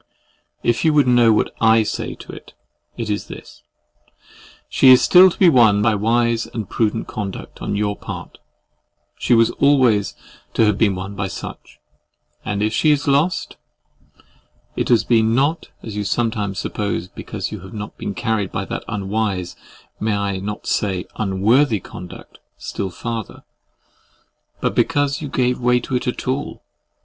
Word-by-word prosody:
If 120 Hz, 0 st, +1 dB
you 160 Hz, -2 st, +3 dB
would 145 Hz, -3 st, +5 dB
know 120 Hz, -2 st, +5 dB
what 105 Hz, -, +1 dB
I 110 Hz, 0 st, +5 dB
say 105 Hz, -, -4 dB
to -, -, -11 dB
it, -, -, -13 dB, 0.4 s
it 115 Hz, -, -3 dB
is 105 Hz, -1 st, -3 dB
this:—She 130 Hz, -, -4 dB
is 130 Hz, -1 st, +9 dB
still 185 Hz, +1 st, +7 dB
to -, -, -8 dB
be 190 Hz, -, +5 dB
won 110 Hz, -9 st, +5 dB
by 110 Hz, -1 st, +3 dB
wise 115 Hz, +2 st, +1 dB
and 110 Hz, -4 st, -6 dB
prudent 110 Hz, +2 st, -1 dB
conduct 100 Hz, -3 st, -7 dB
on -, -, -2 dB
your 105 Hz, 0 st, -1 dB
part; -, -, -8 dB, 0.8 s
she 120 Hz, -, +3 dB
was 115 Hz, 0 st, +4 dB
always 130 Hz, -8 st, +3 dB, 0.4 s
to 115 Hz, -, +4 dB
have 105 Hz, -1 st, +1 dB
been 105 Hz, -4 st, +3 dB
won 95 Hz, +2 st, -6 dB
by 100 Hz, -1 st, -3 dB
such;—and 100 Hz, +2 st, -8 dB
if 110 Hz, +1 st, 0 dB
she 155 Hz, -, +2 dB
is 145 Hz, -1 st, +2 dB
lost, 145 Hz, +6 st, +1 dB, 1.2 s
it -, -, -2 dB
has 120 Hz, -3 st, +4 dB
been 115 Hz, -1 st, +2 dB
not, 145 Hz, +5 st, 0 dB
as 110 Hz, -3 st, -7 dB
you 105 Hz, -, -2 dB
sometimes 105 Hz, -2 st, -1 dB
suppose, 100 Hz, -4 st, -3 dB
because -, -, -6 dB
you -, -, -6 dB
have 95 Hz, +1 st, -12 dB
not 105 Hz, 0 st, -6 dB, 0.2 s
carried 110 Hz, -2 st, -1 dB
that -, -, -4 dB
unwise, 100 Hz, -3 st, -2 dB, 0.4 s
may 110 Hz, -1 st, 0 dB
I 100 Hz, -1 st, -2 dB
not 105 Hz, +2 st, -6 dB
say 95 Hz, -4 st, -1 dB
UNWORTHY? 110 Hz, +5 st, +2 dB
conduct 90 Hz, +1 st, -11 dB, 0.2 s
still 95 Hz, -, -4 dB
farther, 115 Hz, +4 st, -6 dB, 1.2 s
but -, -, 0 dB
because 145 Hz, -2 st, +1 dB
you 145 Hz, -, -5 dB
gave 125 Hz, -1 st, 0 dB
way 125 Hz, 0 st, +3 dB
to 130 Hz, -, -4 dB
it 125 Hz, -, -2 dB
at 125 Hz, -, -3 dB
all. 130 Hz, +3 st, -3 dB
110 Hz, 155 wpm, -20 LUFS, 100-125 Hz, 1.2 s, is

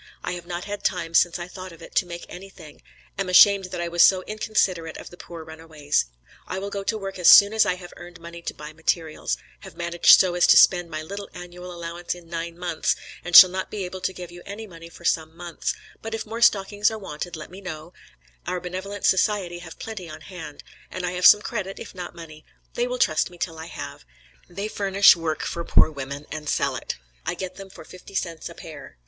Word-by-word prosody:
I -, -, -3 dB
have 175 Hz, -1 st, -7 dB
not 175 Hz, 0 st, -4 dB
had 205 Hz, 0 st, -6 dB
time 170 Hz, -3 st, -1 dB
since 175 Hz, +1 st, +4 dB
I 175 Hz, 0 st, -6 dB
thought 185 Hz, 0 st, -9 dB
of 165 Hz, -, -14 dB
it, -, -, -12 dB
to 180 Hz, -, +2 dB
make 170 Hz, 0 st, -7 dB
anything; 180 Hz, -5 st, -12 dB, 0.4 s
am 195 Hz, -2 st, -1 dB
ashamed 195 Hz, +1 st, +7 dB
that 180 Hz, -1 st, -6 dB
I 170 Hz, -, -2 dB
was 170 Hz, 0 st, +1 dB
so 185 Hz, 0 st, +6 dB
inconsiderate 185 Hz, -6 st, -1 dB
of -, -, -10 dB
the -, -, -11 dB
poor 170 Hz, -2 st, -10 dB
runaways. 160 Hz, -2 st, -2 dB, 0.4 s
I 185 Hz, -, -4 dB
will 200 Hz, +1 st, -5 dB
go 200 Hz, -1 st, -4 dB
to 220 Hz, +2 st, -1 dB
work 195 Hz, -2 st, -6 dB
as 180 Hz, -, +6 dB
soon 205 Hz, +1 st, +9 dB
as 220 Hz, -, +4 dB
I 180 Hz, -, +1 dB
have 180 Hz, -1 st, -11 dB
earned 175 Hz, -1 st, -12 dB
money 170 Hz, 0 st, -10 dB
to -, -, -5 dB
buy 150 Hz, +1 st, -9 dB
materials; 160 Hz, 0 st, -1 dB, 0.2 s
have 160 Hz, -, -13 dB
managed 170 Hz, 0 st, +6 dB
so 185 Hz, -2 st, +3 dB
as 175 Hz, -, +3 dB
to -, -, +7 dB
spend 175 Hz, -2 st, +5 dB
my 155 Hz, -1 st, -5 dB
little 200 Hz, +5 st, -7 dB
annual 180 Hz, 0 st, -9 dB
allowance 170 Hz, 0 st, -5 dB
in 175 Hz, -1 st, -14 dB
nine 165 Hz, 0 st, -5 dB
months, 175 Hz, -2 st, 0 dB, 0.3 s
and 175 Hz, -1 st, -2 dB
shall 185 Hz, -2 st, +12 dB
not 190 Hz, 0 st, -4 dB
be 200 Hz, -3 st, -4 dB
able 185 Hz, +1 st, -7 dB
to 180 Hz, -, -1 dB
give 180 Hz, -2 st, -9 dB
you 175 Hz, 0 st, -11 dB
any 205 Hz, +2 st, -7 dB
money 170 Hz, -4 st, -12 dB
for 170 Hz, -, -14 dB
some 160 Hz, 0 st, 0 dB
months, 175 Hz, -2 st, -4 dB, 0.3 s
but 225 Hz, 0 st, -4 dB
if 225 Hz, -, -5 dB
more 225 Hz, +2 st, -6 dB
stockings 205 Hz, -2 st, +3 dB
are 220 Hz, -, -5 dB
wanted 175 Hz, -3 st, -6 dB
let 155 Hz, +1 st, -9 dB
me 190 Hz, +2 st, -10 dB
know, 165 Hz, -2 st, -8 dB, 0.5 s
our 180 Hz, -, -1 dB
benevolent 185 Hz, +3 st, -5 dB
society 190 Hz, -3 st, +1 dB
have 170 Hz, -2 st, -11 dB
plenty 215 Hz, -6 st, -7 dB
on 155 Hz, -, -10 dB
hand; 165 Hz, -6 st, -10 dB, 0.3 s
and 185 Hz, -1 st, -4 dB
I 175 Hz, -, -1 dB
have 180 Hz, 0 st, +5 dB
some 210 Hz, +2 st, +7 dB
credit 195 Hz, -4 st, -4 dB
if -, -, -9 dB
not 180 Hz, -2 st, -8 dB
money; 155 Hz, -2 st, -11 dB, 0.3 s
they 485 Hz, 0 st, 0 dB
will -, -, -3 dB
trust 485 Hz, -, +2 dB
me 175 Hz, -, -15 dB
till 165 Hz, -1 st, -4 dB
I 160 Hz, -, -7 dB
have; -, -, -8 dB, 0.5 s
they 195 Hz, +4 st, -4 dB
furnish 200 Hz, -2 st, +5 dB
work 165 Hz, -2 st, -3 dB
for 170 Hz, -, -3 dB
poor 160 Hz, -, +4 dB
women 140 Hz, 0 st, -6 dB
and 150 Hz, -1 st, -5 dB
sell -, -, 0 dB
it. -, -, -4 dB, 0.3 s
I -, -, -2 dB
get 185 Hz, -1 st, -6 dB
them 195 Hz, -1 st, -9 dB
for 190 Hz, -, -13 dB
fifty 185 Hz, +2 st, -13 dB
cents 170 Hz, -4 st, -3 dB
a -, -, -12 dB
pair. -, -, -11 dB
180 Hz, 235 wpm, -24 LUFS, 170-195 Hz, 0.5 s, shall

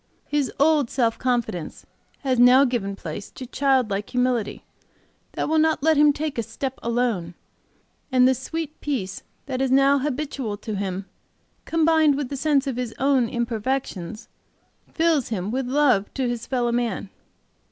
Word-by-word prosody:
"His 290 Hz, -2 st, -1 dB
old 295 Hz, -3 st, +3 dB
self 230 Hz, -3 st, 0 dB
confidence 230 Hz, -10 st, -2 dB, 0.4 s
has 260 Hz, -3 st, 0 dB
now 250 Hz, +3 st, +7 dB
given 220 Hz, -6 st, -2 dB
place 200 Hz, +1 st, -7 dB
to 255 Hz, -, -9 dB
child 260 Hz, -3 st, +1 dB
like 200 Hz, +1 st, -2 dB
humility 250 Hz, -3 st, -1 dB, 0.7 s
that -, -, -2 dB
will 315 Hz, +1 st, +2 dB
not 315 Hz, -2 st, +2 dB
let 320 Hz, 0 st, +4 dB
him 295 Hz, 0 st, +6 dB
take 295 Hz, -3 st, -3 dB
a -, -, +2 dB
step 240 Hz, +4 st, -5 dB
alone, 230 Hz, -8 st, -1 dB, 0.8 s
and 255 Hz, -1 st, +5 dB
the 260 Hz, -, +4 dB
sweet 310 Hz, +4 st, -5 dB
peace 205 Hz, -10 st, -3 dB, 0.2 s
that 260 Hz, -1 st, -3 dB
is 270 Hz, -, +1 dB
now 275 Hz, +2 st, +4 dB
habitual 270 Hz, -6 st, -3 dB
to 215 Hz, 0 st, -5 dB
him 195 Hz, -1 st, -3 dB, 0.6 s
combined 320 Hz, -2 st, +3 dB
with 280 Hz, -3 st, -3 dB
the 280 Hz, -, -4 dB
sense 285 Hz, 0 st, +2 dB
of 265 Hz, -3 st, -3 dB
his 245 Hz, -3 st, -4 dB
own 265 Hz, -3 st, +2 dB
imperfections, 230 Hz, -4 st, -3 dB, 0.6 s
fills 320 Hz, -5 st, +2 dB
him 200 Hz, -2 st, -3 dB
with 260 Hz, +1 st, -2 dB
love 255 Hz, -7 st, +2 dB
to 265 Hz, -2 st, 0 dB
his 240 Hz, -1 st, -4 dB
fellow 245 Hz, -2 st, 0 dB
man. 235 Hz, -4 st, -2 dB
255 Hz, 160 wpm, -23 LUFS, 230-280 Hz, 0.8 s, now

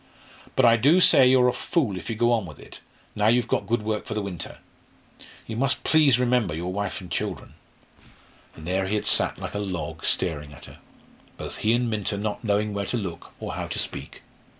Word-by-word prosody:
But 130 Hz, -, +4 dB
I 115 Hz, 0 st, +6 dB
do 145 Hz, +10 st, +4 dB
say 135 Hz, -7 st, +7 dB
you're 130 Hz, -1 st, +5 dB
a 125 Hz, -, +2 dB
fool 130 Hz, -, -1 dB
if 90 Hz, -, -7 dB
you 115 Hz, -, -2 dB
go 120 Hz, +2 st, +2 dB
on 110 Hz, -6 st, +1 dB
with 75 Hz, -, -11 dB
it, -, -, -12 dB, 0.4 s
now 105 Hz, 0 st, +2 dB
you've 120 Hz, +2 st, +3 dB
got -, -, -1 dB
good 115 Hz, -1 st, 0 dB
work 110 Hz, 0 st, -2 dB
for 110 Hz, -, -5 dB
the 105 Hz, -, -1 dB
winter; 90 Hz, -5 st, -6 dB, 0.9 s
you 110 Hz, -, -6 dB
must 135 Hz, +4 st, 0 dB
please 150 Hz, -6 st, +4 dB
remember 125 Hz, -8 st, +1 dB
your 90 Hz, +3 st, -4 dB
wife 100 Hz, 0 st, -3 dB
and 90 Hz, -1 st, -11 dB
children." 100 Hz, +1 st, -4 dB, 1.0 s
And 80 Hz, -, -11 dB
there 95 Hz, +1 st, 0 dB
he 105 Hz, -, -1 dB
had 105 Hz, -, -2 dB
sat -, -, +2 dB
like -, -, -6 dB
a 105 Hz, -, -3 dB
log, 85 Hz, -5 st, -5 dB
staring 75 Hz, -5 st, 0 dB
at 70 Hz, -, -13 dB
her -, -, -14 dB, 0.6 s
both -, -, -6 dB
he 110 Hz, -, +1 dB
and 120 Hz, 0 st, +1 dB
Minta 105 Hz, -2 st, -1 dB
not 105 Hz, +2 st, -4 dB
knowing 105 Hz, -1 st, 0 dB
where 100 Hz, -1 st, -3 dB
to 120 Hz, -, -1 dB
look, 95 Hz, -6 st, -6 dB
or -, -, -5 dB
how -, -, -4 dB
to -, -, -4 dB
speak. -, -, -5 dB
105 Hz, 220 wpm, -25 LUFS, 95-120 Hz, 1.0 s, say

